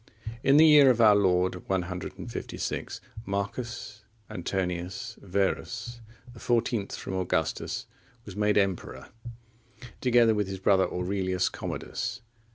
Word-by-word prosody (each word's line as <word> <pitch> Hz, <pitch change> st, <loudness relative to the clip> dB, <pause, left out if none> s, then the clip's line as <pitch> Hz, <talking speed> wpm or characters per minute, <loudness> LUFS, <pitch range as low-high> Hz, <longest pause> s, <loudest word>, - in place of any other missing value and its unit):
In 135 Hz, +2 st, +5 dB
the 160 Hz, -, +8 dB
year 150 Hz, -3 st, +8 dB
of 120 Hz, -2 st, +3 dB
our 110 Hz, -2 st, +7 dB
Lord 90 Hz, -2 st, +1 dB
156, 90 Hz, -1 st, -4 dB, 0.2 s
Marcus 105 Hz, +2 st, -4 dB, 0.3 s
Antoninus 95 Hz, +6 st, -3 dB
Verus,(41) 115 Hz, +5 st, -3 dB
the 120 Hz, -, -13 dB
fourteenth 115 Hz, -3 st, 0 dB
from -, -, -6 dB
Augustus, 90 Hz, -4 st, -1 dB, 0.4 s
was 100 Hz, -, -9 dB
made 105 Hz, 0 st, +2 dB
emperor, 95 Hz, -3 st, -1 dB, 0.9 s
together 120 Hz, -3 st, +4 dB
with 105 Hz, -2 st, 0 dB
his 95 Hz, 0 st, -5 dB
brother, 95 Hz, 0 st, +3 dB
Aurelius 95 Hz, 0 st, 0 dB
Commodus. 120 Hz, -, -5 dB
100 Hz, 110 wpm, -28 LUFS, 95-120 Hz, 0.9 s, the